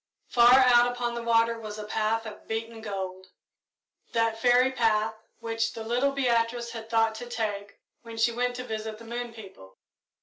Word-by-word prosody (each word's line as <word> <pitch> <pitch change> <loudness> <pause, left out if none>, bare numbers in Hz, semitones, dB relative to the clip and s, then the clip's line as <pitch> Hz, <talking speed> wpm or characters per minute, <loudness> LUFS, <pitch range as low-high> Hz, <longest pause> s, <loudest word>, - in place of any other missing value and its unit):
Far 240 +1 +7
out 245 -2 +6
upon 245 -1 -3
the 235 - -4
water 230 0 +2
was 215 -1 -7
a 215 - -6
path 220 +1 -1
of 215 -1 -10
beaten 225 0 -4
gold 190 -3 -5 0.9
that 230 -1 +1
fairy 250 +2 +4
path 225 -3 +1 0.2
which 225 -1 -2
the 225 - -6
little 245 +5 +1
Beatrice 235 -3 0
had 225 -1 -8
thought 225 -1 +2
to 240 +2 -8
take 205 -4 -4 0.2
when 230 -1 -10
she 225 +1 +3
went 245 +1 -1
to 250 - -5
visit 220 -2 -5
the 230 - -13
moon 240 +1 -5
people. 190 - -13
230 Hz, 175 wpm, -27 LUFS, 220-240 Hz, 0.9 s, Far